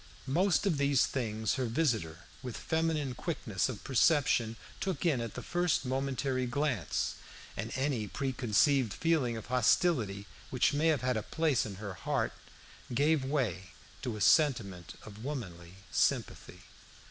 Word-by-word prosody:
Most 175 +5 +2
of 165 -8 +1
these 140 -2 +4
things 110 -4 -1
her 125 - 0
visitor, 110 - 0 0.2
with 125 -3 -6
feminine 160 -4 0
quickness 125 - -2
of 115 -6 -6
perception, 125 -3 +3 0.2
took 185 -4 -2
in 145 -8 +2
at 115 -2 -5
the - - -6
first 175 -4 0
momentary 130 0 -1
glance, 130 - -1 0.4
and 110 +4 -4
any 130 -5 0
pre 135 +5 -2
conceived 125 0 +2
feeling 150 -9 +1
of 110 - -7
hostility 120 - +2 0.2
which 130 +1 +2
may 150 +3 +2
have 155 -4 +3
had 125 -2 +1
a - - -1
place 150 -1 0
in 100 - -7
her 100 0 -6
heart 130 +3 -1 0.6
gave 145 +3 +2
way 110 - -2 0.3
to 120 -5 -3
a - - -7
sentiment 110 - +2
of 110 +1 -11
womanly 90 - -6 0.2
sympathy. - - 0
130 Hz, 145 wpm, -31 LUFS, 110-145 Hz, 0.6 s, these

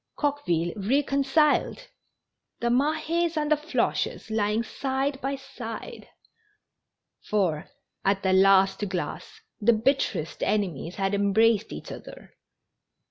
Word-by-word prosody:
Coqueville 175 - 0
reconciled 275 +6 +2
I - - -14 0.8
The 235 - 0
Mahes 315 +5 +1
and 300 0 0
the - - +7
Floches 300 -6 -2
lying 215 +1 +1
side 270 +3 -2
by 275 +1 -1
side! 265 -5 -8 1.2
For, 180 -8 0 0.3
at 195 0 +1
the 190 -1 +2
last 195 +1 +4
glass, 180 -1 -5 0.2
the 235 +2 +4
bitterest 225 - 0
enemies 185 -5 -1
had 195 -1 -1
embraced 210 +2 +3
each - - -8
other. - - -11
225 Hz, 110 wpm, -26 LUFS, 195-280 Hz, 1.2 s, the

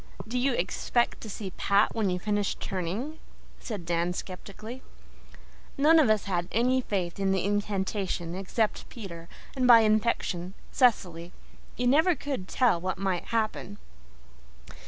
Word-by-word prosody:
"Do 250 +3 -1
you 265 +1 +2
expect 235 +4 0
to 220 - -7
see 195 -1 -6
Pat 200 +1 +3
when 215 -4 0
you 180 - 0
finish 205 +1 -1
turning?" 200 - -4 0.4
said 205 -7 -6
Dan 170 +1 0
skeptically. 210 +7 -8 1.0
None 315 +4 +6
of 285 -8 +4
us 215 -1 +3
had 175 -3 -1
any 255 +3 +2
faith 185 -6 -3
in 195 -1 +1
the 190 -1 +1
incantation 195 -3 -1
except 195 +4 -1
Peter, 170 -8 -9 0.3
and, 255 -2 +2
by 235 -2 +9
infection, 215 -4 0 0.2
Cecily. 180 - +1 0.4
You 245 - -1
never 315 +8 +4
could 270 -9 -4
tell 235 -9 +2
what 185 0 -2
might 190 -2 -1
happen. 215 -3 -2
205 Hz, 140 wpm, -28 LUFS, 185-240 Hz, 1.0 s, by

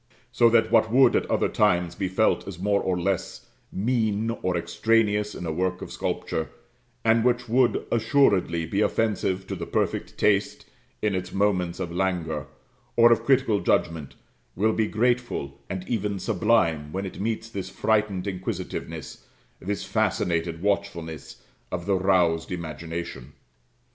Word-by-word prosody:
So 120 - +5
that 110 -1 +3
what 110 - +4
would 130 0 +5
at - - 0
other - - +2
times 90 -5 +2
be 95 - -2
felt 95 +3 +1
as 95 -4 -6
more 100 +2 +1
or 90 -1 -1
less 95 +1 -2 0.3
mean 110 0 0
or 90 -1 0
extraneous 105 +4 +1
in - - -6
a 80 - -2
work 90 +3 -1
of - - -8
sculpture, 80 - -3 0.6
and 115 0 +4
which 120 0 +1
would 120 +2 +2
assuredly 110 -8 +2
be 100 +6 -1
offensive 100 -4 0
to - - -4
the - - -6
perfect - - -2
taste - - +1 0.4
in 105 -2 +2
its 95 -1 -3
moments 95 -3 0
of 90 -2 -3
languor, 85 -5 -2 0.5
or 120 0 +7
of 115 - +3
critical 130 -6 +3
judgment, 80 -7 0 0.4
will 110 +4 +2
be 110 -1 +1
grateful, 120 - -1
and 95 -1 -5
even 105 -4 -1
sublime, 90 -7 +1
when 95 +3 -3
it 95 - -7
meets 110 +1 -2
this 95 -4 -6
frightened 105 -1 0
inquisitiveness, 95 -2 -5 0.3
this 100 +2 -3
fascinated 85 0 -1
watchfulness, 85 -6 -3 0.3
of 85 - -3
the 100 - +1
roused 90 -4 +2
imagination. 80 -4 -6
95 Hz, 150 wpm, -25 LUFS, 85-110 Hz, 0.6 s, or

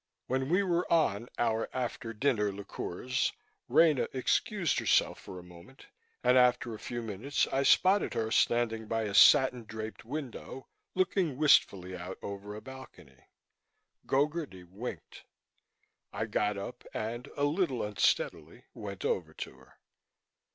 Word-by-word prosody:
When 130 +1 -1
we 185 +4 +3
were 175 -2 0
on 120 -9 +2
our 115 -1 0
after 120 -2 -3
dinner 110 -3 +1
liqueurs, 100 +4 -3 0.4
Rena 155 -5 +4
excused 170 - +1
herself - - +2
for 95 - -10
a 90 - -9
moment 90 +8 -15 0.4
and, 125 - +5
after 125 -2 +3
a 110 - -8
few 120 -1 -5
minutes, 115 +7 -1
I 135 - +2
spotted 185 +8 +4
her 110 -1 -1
standing 115 -2 +1
by 115 0 -1
a 105 -2 -3
satin 125 +3 +6
draped 110 0 -7
window, 135 0 -7 0.3
looking 185 -6 +1
wistfully 95 -11 +3
out 90 +1 -7
over 100 +1 -6
a 105 - -8
balcony. 130 - -13 0.8
Gogarty 145 - -1
winked. 105 +8 -8 0.9
I 110 +2 -2
got 105 -1 0
up 100 +5 -7
and, 120 +4 -4
a 145 - 0
little 145 - +1
unsteadily, 105 -5 0
went 100 -2 -7
over 80 -4 -1
to - - -6
her. - - -20
120 Hz, 135 wpm, -30 LUFS, 105-135 Hz, 0.9 s, satin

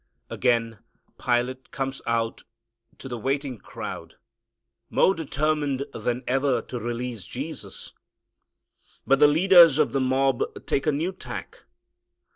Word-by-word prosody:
Again 115 -3 +1 0.4
Pilate 125 +1 0
comes 135 0 -4
out 115 -1 -1 0.5
to - - -9
the 120 -2 -5
waiting 135 -1 -2
crowd - - -8 0.7
more 190 - +4
determined 150 -3 -1
than 125 +1 -2
ever 135 +1 +1
to 125 - -6
release 120 -2 -4
Jesus. - - -7 1.1
But 135 0 +4
the 150 - +8
leaders 165 -1 +7
of - - +2
the 135 - 0
mob 130 0 +2 0.2
take 135 - 0
a - - +5
new 160 +6 -1
tack. 185 - -9
135 Hz, 120 wpm, -25 LUFS, 120-145 Hz, 1.1 s, the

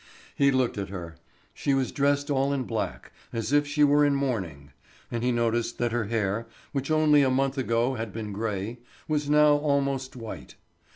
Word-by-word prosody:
He 140 -1 +4
looked 130 -5 +1
at 100 -1 -4
her. 85 -4 -7 0.4
She 140 - 0
was 135 -2 0
dressed 145 +1 +1
all 135 0 +1
in 135 -2 -1
black 115 -2 -4 0.2
as 115 +3 -3
if 145 0 +4
she 145 +1 +2
were 145 0 +5
in 145 -1 +3
mourning, 95 - -3 0.4
and 120 0 -2
he 125 - +2
noticed 120 0 0
that 120 -1 0
her 120 -1 0
hair, 110 0 -1 0.2
which 140 0 -3
only 155 -2 +5
a 135 - +3
month 135 +1 +1
ago 120 -1 +1
had 115 -3 -4
been 105 0 -5
gray, 105 +2 -3 0.3
was 150 -2 -1
now 150 0 +5
almost 140 -2 -1
white. 115 -3 -8
130 Hz, 185 wpm, -27 LUFS, 115-140 Hz, 0.4 s, were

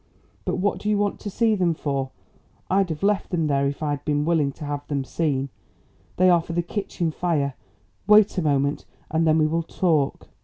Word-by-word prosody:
But - - 0
what 195 +2 0
do 210 - -3
you 210 - +2
want 205 0 0
to 210 - -5
see 225 +2 +2
them 180 -5 +1
for? 140 -3 -2 0.6
I'd 195 -1 +3
have 160 +2 -5
left 205 0 +1
them 165 -3 0
there 140 -2 +1
if 140 +2 -4
I 150 - 0
had 145 - -3
been 150 0 0
willing 155 -4 +2
to 150 - -8
have 145 0 -4
them 140 -2 -1
seen. 140 -2 -1 0.7
They 185 - +5
are 175 -2 +5
for 170 - -7
the 175 +1 0
kitchen 175 -3 -3
fire. 150 -5 -1 0.5
Wait 210 0 +6
a - - 0
moment 140 -2 0 0.3
and 160 +1 +2
then 155 0 +4
we 155 - +3
will 165 +2 0
talk." 160 -4 0
160 Hz, 215 wpm, -24 LUFS, 145-185 Hz, 0.7 s, Wait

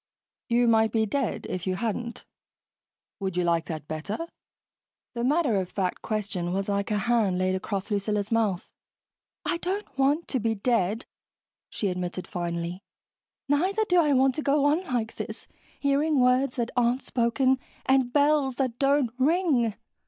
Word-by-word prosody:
"You 240 +1 +3
might 220 -1 +4
be 220 -1 +2
dead 265 +2 -2
if 185 0 -4
you 185 - +1
hadn't. 235 +3 -3 0.9
Would 190 -2 -3
you 180 - +2
like 170 -1 +1
that 155 -3 -6
better?" 155 +7 -4 1.0
The 235 -1 -3
matter 280 -4 +2
of 185 -2 -2
fact 185 -3 -2
question 195 -5 -2
was 195 +1 -1
like 200 0 -1
a 210 - +1
hand 205 -3 +2
laid 185 0 +1
across 195 +2 -3
Lucilla's 205 +1 -1
mouth. 215 -6 0 0.7
"I - - 0
don't 370 -3 -4
want 285 +5 +2
to 260 - 0
be 225 0 0
dead," 220 0 0 0.6
she 205 - -1
admitted 180 0 -3
finally. 170 +1 -4 0.7
"Neither 370 +10 +2
do 360 -2 +5
I 300 -3 +2
want 265 0 +4
to 305 - -3
go 285 0 +2
on 305 +5 +3
like 230 -2 -2
this, - - -6 0.3
hearing 285 +1 +2
words 250 +1 +3
that 240 -1 -2
aren't 245 +1 +2
spoken 255 +2 +1 0.3
and 265 -2 +3
bells 285 -2 +3
that 250 -2 -2
don't 275 -3 +3
ring. 275 - +2
235 Hz, 160 wpm, -27 LUFS, 195-275 Hz, 1.0 s, do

